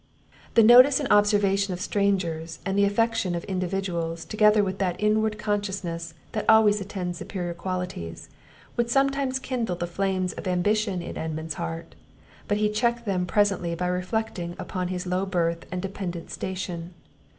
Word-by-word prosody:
The 230 - +7
notice 250 +5 +8
and 285 - -2
observation 200 -2 +3
of - - -9
strangers, 180 -6 -1
and 195 -1 -1
the 200 0 +4
affection 225 -2 +1
of 170 - -3
individuals, 180 -3 -2
together 210 -1 +4
with 190 0 -3
that 180 -2 -1
inward 215 0 +2
consciousness 195 -6 -3 0.2
that 215 - -2
always 215 -2 +6
attends 180 -3 -4
superiour 175 -3 -4
qualities, 180 - -5 0.5
would 235 0 0
sometimes 275 0 +2
kindle 245 -7 -2
the 175 - -3
flames 185 +1 -1
of - - -7
ambition 190 +1 +1
in - - -6
Edmund's 160 0 -3
heart; 165 +2 -5 0.5
but 205 - +1
he 210 0 +2
checked 235 +2 0
them 185 -3 0
presently 195 -4 +1
by 180 +2 -2
reflecting 180 -1 -2
upon 185 -1 -3
his 180 0 -4
low 180 +1 0
birth 170 -3 -1
and 180 +1 -3
dependant 185 -3 -5
station. 180 -2 -5
190 Hz, 155 wpm, -26 LUFS, 175-210 Hz, 0.5 s, notice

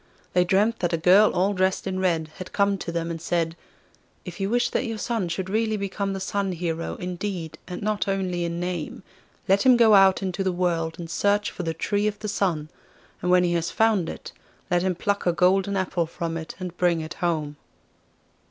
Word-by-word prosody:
They 180 - +4
dreamt 205 +6 +2
that 175 -1 -1
a - - +2
girl 185 +6 +6
all 195 +3 +1
dressed 190 0 0
in 190 -1 -2
red 165 -4 0
had 185 -1 -8
come 200 -1 +2
to 170 - -4
them 170 0 -2
and 165 -1 -5
said: 165 -1 -1 0.7
'If - - -8
you 195 0 -1
wish 240 +2 +1
that 255 - 0
your 225 -1 -3
son 220 -5 -2
should 185 +2 -3
really 220 +2 0
become 200 0 -2
the 195 - -4
Sun 195 0 -1
Hero 165 -1 -3
in 180 0 -5
deed 180 -5 -5
and 180 +2 -6
not 215 0 0
only 185 -3 -1
in 170 0 -3
name, 175 0 -4 0.4
let 195 +1 +4
him 255 0 +6
go 225 -2 +6
out 195 -1 +6
into 190 +1 -2
the 190 - +1
world 170 -2 -1
and 170 - -6
search 205 +4 +1
for - - -6
the 165 -2 -3
Tree 205 +5 0
of 210 -1 -2
the 210 0 -6
Sun, 170 -7 -1 0.5
and 180 - -1
when 180 0 +5
he 175 -1 +1
has 170 -1 0
found 220 -6 +2
it, - - -8 0.4
let 175 0 +3
him 185 0 0
pluck 200 +2 -1
a - - +5
golden 195 +3 +2
apple 175 -3 -1
from 165 0 -4
it 160 -1 -6
and 180 -2 -6
bring 175 -2 +2
it 155 +2 -6
home. 155 -4 -1
185 Hz, 215 wpm, -25 LUFS, 170-200 Hz, 0.7 s, girl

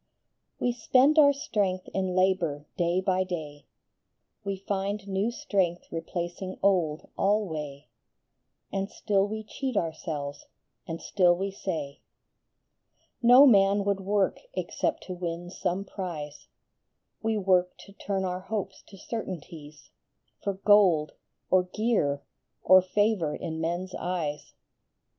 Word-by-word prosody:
E 245 - +1
spend 260 +6 +4
our 285 -2 +8
strength 200 -10 -1
in 190 -1 -1
labor 180 -6 +1
day 175 +1 +1
by 185 -1 +1
day, 150 -6 -6 0.8
We 200 0 -2
find 200 +1 -3
new 195 +3 0
strength 190 -7 -1
replacing 175 +3 -4
old 175 -6 +2
alway; 155 -9 -1 0.9
And 195 0 -1
still 200 -1 +1
we 220 +1 -5
cheat 255 +2 -4
ourselves, 155 -4 -3 0.4
and 165 0 -4
still 175 +1 +3
we 195 +2 -2
say 160 -8 -4 0.6
" - - -45
No 265 +3 +10
man 200 -4 +5
would 200 -1 +1
work 195 0 0 0.2
except - - -2
to 185 - -6
win 175 0 -5
some 185 +1 -2
prize; 160 -7 -6 0.7
We 220 0 0
work 185 -2 +2
to 200 - -15
turn 195 -1 -2
our 180 0 -2
hopes 195 -1 -4
to 195 - -13
certainties, 165 -8 -7 0.5
For 200 -1 -1
gold, 190 -6 +4 0.4
or 185 - +6
gear, 180 -9 0 0.4
or 185 0 +7
favor 190 -4 +1
in 160 0 -5
men 170 +2 -1
s 185 - -11
eyes." 160 -5 -4
185 Hz, 125 wpm, -28 LUFS, 170-200 Hz, 0.9 s, No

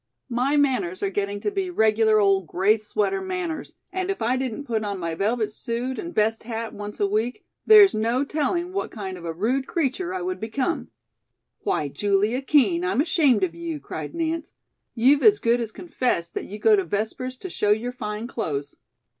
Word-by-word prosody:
My 255 +5 +1
manners 255 -11 +1
are 195 - 0
getting 200 +1 -2
to - - -1
be 390 -2 -2
regular 220 -6 +3
old 195 -3 +3
gray 200 +7 +2
sweater 215 - -1
manners, 365 -4 -4 0.2
and 370 0 -2
if 390 - -1
I 235 +3 +1
didn't 260 0 -3
put 225 -5 -2
on 200 -1 -3
my 170 -2 -3
velvet 215 +4 0
suit 240 +4 -3
and 340 - -5
best 225 -4 +1
hat 225 0 -5
once 205 0 -7
a 205 - +3
week 220 +5 -1 0.2
there's 420 -3 +9
no 230 +5 +1
telling 340 +5 -1
what 390 - -2
kind 195 -4 -6
of 175 -2 -10
a 165 - -2
rude 240 +11 -1
creature 340 +3 -1
I 370 -1 -3
would 370 0 -3
become." 255 +9 -2 0.7
"Why, 390 - -1
Julia 205 - +1
Kean, 305 +5 +3
I'm 365 -6 0
ashamed 290 - +3
of 175 -3 0
you," 170 -2 -5
cried 145 +2 -7
Nance, 330 -1 -2 0.4
"you've 265 +5 +4
as 425 -1 +6
good 235 - +2
as 225 -2 -4
confessed 245 - -2
that - - -4
you 205 - -7
go 215 0 +5
to 195 - +1
Vespers 220 +8 -3
to 375 - -7
show 210 - 0
your 220 +4 +2
fine 210 -2 -5
clothes." 155 - -4
230 Hz, 195 wpm, -24 LUFS, 205-300 Hz, 0.7 s, there's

